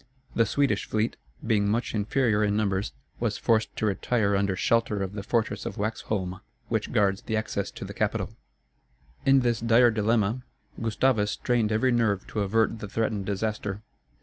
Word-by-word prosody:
The 115 -2 +3
Swedish 130 -4 +1
fleet, 110 +2 0 0.3
being 105 -3 +2
much 115 +3 -1
inferior 110 0 +1
in 105 0 +1
numbers, 100 - 0 0.3
was - - -1
forced 110 -1 +1
to - - -1
retire 100 0 +1
under 100 -1 +1
shelter 110 0 +1
of 95 0 -5
the 100 - -4
fortress 115 +2 -1
of - - -5
Waxholm, 100 -3 -3 0.3
which - - -1
guards 100 -2 +2
the 110 - -2
access 110 - -2
to - - -8
the - - -7
capital. - - -1 1.0
In 135 0 +6
this 120 -2 +1
dire 115 +1 +5
dilemma, 110 +2 +1 0.4
Gustavus 110 -1 +2
strained 115 -1 0
every 110 +4 +2
nerve 110 -5 +1
to 110 - -3
avert 110 +3 +1
the 105 - -6
threatened 105 -2 -1
disaster. 105 0 -2
110 Hz, 165 wpm, -27 LUFS, 100-115 Hz, 1.0 s, In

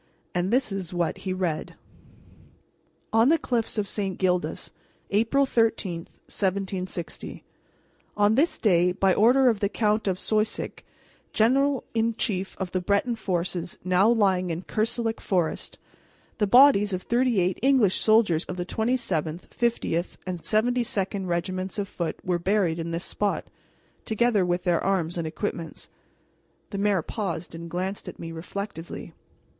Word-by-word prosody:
And 180 +1 0
this 255 -2 +2
is 195 -4 -4
what 175 -1 -1
he - - 0
read: 180 -4 -2 1.4
"ON 225 +3 +5
THE 330 - +5
CLIFFS 235 -6 -2
OF 205 -1 0
ST. 195 -2 -2
GILDAS, 180 -1 -1 0.4
APRIL 230 +7 +3
13, 225 -8 +1 0.3
1760. 190 -3 -3 0.7
"On 205 +1 +4
this 290 +9 +2
day, 180 -4 +3
by 190 0 +3
order 250 +6 +5
of 225 -4 +3
the 200 - +1
Count 215 0 +1
of 185 -2 +1
Soisic, 215 +2 -1 0.5
general 270 +4 +3
in 230 0 +1
chief 195 -5 -2
of 190 -2 -4
the 185 - -1
Breton 200 +6 +1
forces 180 -3 -3
now 185 +4 +4
lying 190 -6 +2
in 165 +2 -3
Kerselec 225 +2 -1
Forest, 175 -5 -1 0.6
the 210 - +2
bodies 225 -4 +6
of 185 - -3
thirty 240 -2 +2
eight 180 0 0
English 255 -7 +4
soldiers 215 -7 +4
of 185 - -6
the 175 - -2
27th, 190 -8 -1
50th, 205 -7 -1
and 185 -2 -4
72d 215 -2 0
regiments 185 +3 -2
of 200 -1 -2
Foot 170 -4 -4
were 180 -1 0
buried 180 -2 +1
in 165 0 -3
this 170 +1 -3
spot, 205 -1 -2 0.5
together 220 -2 +2
with 175 0 0
their 175 -2 +1
arms 175 -3 0
and 165 - -2
equipments." 170 -1 -5 0.8
The 200 - -3
mayor 200 -4 +2
paused 180 -6 -4
and 170 0 -7
glanced 185 +3 -3
at - - -7
me 165 -1 -7
reflectively. 175 +1 -6
195 Hz, 145 wpm, -26 LUFS, 180-225 Hz, 1.4 s, bodies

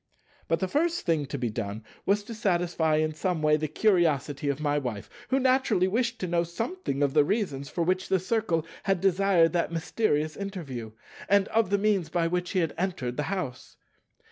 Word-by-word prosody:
But 165 - +1
the 190 - +1
first 335 - 0
thing 160 -4 +1
to 140 - -4
be 120 -3 -2
done 105 -1 -4 0.2
was 205 +1 +2
to 230 - -8
satisfy 175 -6 +1
in 155 0 +1
some 160 0 -2
way 150 0 +5
the 155 0 -1
curiosity 155 -6 +1
of 140 0 -1
my 145 -1 +1
Wife, 120 -7 -5 0.2
who 265 - +3
naturally 255 -8 +3
wished 235 +4 0
to 185 - -1
know 170 0 +1
something 175 - -3
of 140 -1 +1
the 150 - +5
reasons 145 -7 -2
for 170 - -1
which 185 +2 0
the 190 - +4
Circle 185 -4 0 0.2
had 195 -2 +1
desired 190 -2 +3
that 170 -1 0
mysterious 160 -2 0
interview, 145 - -6 0.4
and 200 0 +4
of 225 -3 +2
the 200 - +3
means 200 -5 +1
by 170 +1 0
which 180 +1 -1
he 190 - +2
had 165 -3 -1
entered 175 -10 -2
the 150 - -1
house. 155 -11 -5
175 Hz, 195 wpm, -27 LUFS, 150-200 Hz, 0.4 s, way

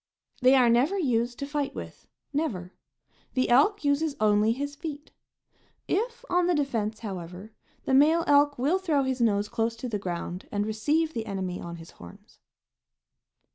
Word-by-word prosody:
They 255 +2 +6
are 255 -2 +5
never 255 +12 +3
used 245 -7 0
to 280 - -4
fight 285 -1 -3
with, - - -9 0.3
never; 205 - -2 0.6
the 255 0 +1
elk 300 - +4
uses 285 +1 +1
only 210 +1 +3
his 285 +4 -3
feet. 295 -1 -7 0.8
If 475 +4 -2
on 355 -3 +2
the 355 - +2
defense, 225 -7 -1
however, 190 0 -7 0.3
the - - 0
male 310 +5 +5
elk 290 0 +4
will 295 +10 +1
throw 315 -7 +1
his 260 -1 -2
nose 205 -3 +2
close 225 +2 -1
to 235 +2 -6
the 215 -4 -3
ground 180 -1 -5
and 205 0 -1
receive 300 +10 0
the 225 -1 -4
enemy 190 -3 -4
on 170 0 -7
his 165 0 -12
horns. 85 0 -15
255 Hz, 165 wpm, -27 LUFS, 210-295 Hz, 0.8 s, They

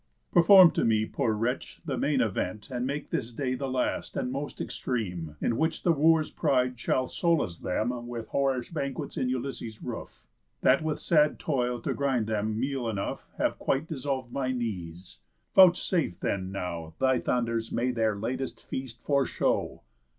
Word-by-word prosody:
Perform 180 0 +8
to - - 0
me, 110 -1 +3
poor 110 - -1
wretch, 115 +4 -2
the 140 -5 -2
main 140 +1 +1
event, 105 +1 -2
And 125 0 -2
make 145 +2 -4
this 130 -8 -2
day 130 +2 -2
the 135 +1 -3
last, 130 -1 -1
and 125 - -1
most 140 +2 -5
extreme, 90 - -3
In 115 - 0
which 160 0 0
the 175 - +4
Wooers' 160 0 +3
pride 125 -5 +1
shall 130 +2 +1
solace 160 - 0
them 120 +5 -2
With 120 -2 -6
whorish 135 +1 0
banquets 140 -4 -3
in 125 - 0
Ulysses' 125 -3 -4
roof, - - -7 0.4
That, 135 +3 +4
with 155 -1 -1
sad 150 -3 +3
toil 125 -5 -1
to - - -1
grind 135 -5 0
them 110 0 -1
meal 130 -2 -1
enough, 100 -3 -4
Have - - 0
quite 135 +3 0
dissolv'd 135 -5 -3
my 130 -2 -1
knees. 90 - -5 0.3
Vouchsafe, 180 - +4
then, 95 -1 -2
now 85 -4 -5
Thy 130 -1 +3
thunders 115 -2 -1
may 125 +2 0
their 110 -3 +1
latest 125 +6 -3
feast 125 -3 -7
foreshow." 140 -2 0
125 Hz, 165 wpm, -28 LUFS, 110-140 Hz, 0.4 s, Perform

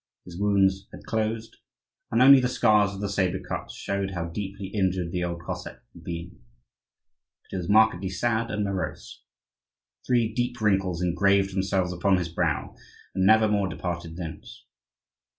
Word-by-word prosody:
His 90 - -10
wounds 95 0 +2
had - - -12
closed, 110 0 -2 0.5
and 115 +3 +3
only 135 +1 +9
the 125 - +1
scars 105 -5 +3
of 95 - -7
the 100 - -1
sabre 95 -2 0
cuts - - -6
showed 100 -1 -3
how 85 -1 -3
deeply 100 +2 -5
injured 95 -4 -1
the 90 0 -2
old 85 -1 -4
Cossack - - -6
had - - -14
been. 85 0 -7 1.0
But - - -26
he - - -3
was 90 -2 -4
markedly 105 -3 +4
sad 115 +4 -1
and 105 0 -1
morose. 100 -3 -4 0.9
Three 120 -3 +2
deep 120 +1 -2
wrinkles 95 -4 +1
engraved 95 +2 +2
themselves 95 -1 0
upon 95 +2 +2
his 85 -2 -2
brow 85 - -1 0.4
and 95 0 +2
never 110 +1 +6
more 100 -2 +1
departed 85 -1 -5
thence. 80 -3 -8
95 Hz, 160 wpm, -26 LUFS, 90-105 Hz, 1.0 s, only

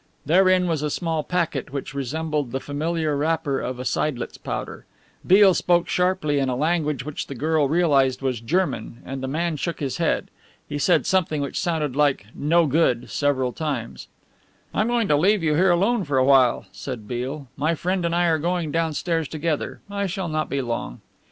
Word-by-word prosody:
Therein 185 +3 +4
was 165 -4 0
a 150 - -1
small 160 0 -1
packet 170 -5 -2
which 140 0 -5
resembled 145 0 -2
the 135 - -2
familiar 155 +2 -2
wrapper 150 -1 0
of 125 0 -4
a 125 - -6
seidlitz 130 -4 -1
powder. - - -6 0.4
Beale 195 0 +7
spoke 175 +1 +2
sharply 180 -5 +1
in 135 -1 0
a 125 - -1
language 150 -1 0
which 150 -1 -5
the 140 - -7
girl 155 +1 +1
realized 140 -6 +3
was 130 -3 -1
German, 120 -5 -2
and 135 0 -5
the 130 - -3
man 160 +3 -1
shook 170 +4 -3
his 140 -4 -3
head. - - 0 0.4
He 145 - -4
said 175 +5 +3
something 180 -6 +1
which 140 -1 -3
sounded 160 -7 -1
like 145 -8 +2
"No 165 +3 +2
good," 135 -5 +1
several 130 -4 0
times. 140 -8 -4 0.7
"I'm 215 - +1
going 240 -3 +1
to 150 - +4
leave 190 +5 +3
you 155 -2 +2
here 185 +5 +4
alone 200 +6 +2
for 145 -5 -1
awhile," 130 -1 +4
said 120 -6 -7
Beale, 130 +4 -4
"my 155 +4 0
friend 180 +3 -1
and 170 0 0
I 175 0 +3
are 160 -2 +2
going 170 -1 -1
downstairs 165 0 -1
together 155 0 -3
I 200 0 -2
shall 190 -1 -3
not 155 0 -1
be 140 -1 -1
long." 115 - -4
155 Hz, 185 wpm, -23 LUFS, 135-170 Hz, 0.7 s, Beale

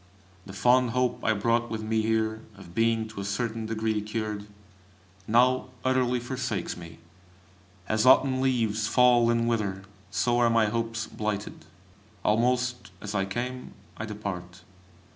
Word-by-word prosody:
The 95 - -9
fond 125 +6 +3
hope 125 -1 0
I 110 - +3
brought 115 +3 +1
with 110 -1 -4
me 110 0 +1
here, 110 0 0 0.2
of 90 -3 -13
being 115 +1 +1
to 110 - -9
a - - -4
certain 110 +3 -2
degree 110 -1 -1
cured, 105 -1 -4 0.8
now 125 +3 +3 0.2
utterly 130 -1 +2
forsakes 120 -6 -3
me. 85 -1 -11 0.9
As 110 0 +1
autumn 130 0 +5
leaves 115 -5 +1
fall 120 -1 +5
and 115 0 +2
wither, 100 -5 -1 0.3
so 120 +3 +1
are 120 -1 +4
my 115 -1 +4
hopes 115 0 -2
blighted. 105 -5 -4 0.6
Almost 125 +2 +1
as 105 0 -6
I 95 -2 +1
came, 125 +5 -5 0.2
I 105 - -5
depart. 90 -4 -6
115 Hz, 145 wpm, -27 LUFS, 105-120 Hz, 0.9 s, autumn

